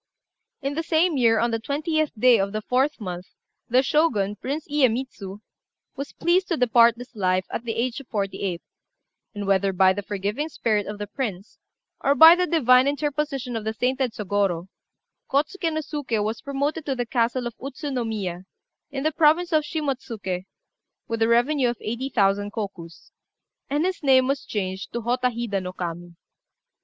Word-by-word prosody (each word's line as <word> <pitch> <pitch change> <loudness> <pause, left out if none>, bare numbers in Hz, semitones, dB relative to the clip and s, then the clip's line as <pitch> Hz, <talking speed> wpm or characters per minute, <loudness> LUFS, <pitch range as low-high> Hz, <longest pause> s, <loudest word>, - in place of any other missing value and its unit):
In 275 +1 -1
the 320 - -1
same 330 0 +2
year, 230 -4 +4
on 235 +2 +1
the 225 - -1
20th 310 +5 -1
day 240 0 +5
of 195 +1 -1
the 215 0 -3
4th 265 +5 +1
month, 180 -3 -6 0.4
the 250 +3 +4
Shogun, 235 -10 +1
Prince 285 +9 -4
Iyémitsu, 245 -8 -1 0.5
was 280 +1 -6
pleased 360 +2 +2
to 335 - -1
depart 235 -1 +5
this 245 0 -11
life, 185 -2 +1
at 235 - -4
the 225 - -2
age 245 +3 -1
of 275 - -13
forty 200 -4 -3
eight; 180 -4 -3 0.7
and 205 -1 -4
whether 195 0 +2
by 185 0 +4
the 205 - -4
forgiving 205 +9 -3
spirit 215 -8 0
of 205 0 -5
the 205 - -4
prince, 205 -4 -5 0.4
or 280 0 +3
by 320 +4 +10
the 360 +1 +1
divine 255 -6 +5
interposition 285 -3 -2
of 225 - -3
the 220 +1 -3
sainted 255 0 0
Sôgorô, 195 -4 -1 0.6
Kôtsuké 325 +5 0
no 315 0 -1
Suké 280 -8 -2
was 220 +2 -3
promoted 285 +3 -2
to 270 - 0
the 245 -1 -2
castle 240 +1 0
of 240 - -4
Utsu 280 +2 -5
no 250 -2 -1
Miya, 190 -5 -4 0.4
in 275 -2 -4
the 310 - +2
province 325 +3 +3
of 310 -1 +3
Shimotsuké, 255 - -3 0.6
with 230 0 -3
a 225 - +4
revenue 245 +3 +3
of 240 - -3
eighty 235 +5 -4
thousand 205 -3 +1
kokus; 185 -6 -7 0.6
and 295 +4 +1
his 370 -1 -2
name 260 -3 +5
was 275 0 -1
changed 190 -2 -4
to 235 - -2
Hotta 250 +2 +1
Hida 230 -5 -3
no 180 0 -6
Kami. 175 -1 -6
240 Hz, 180 wpm, -24 LUFS, 205-285 Hz, 0.7 s, by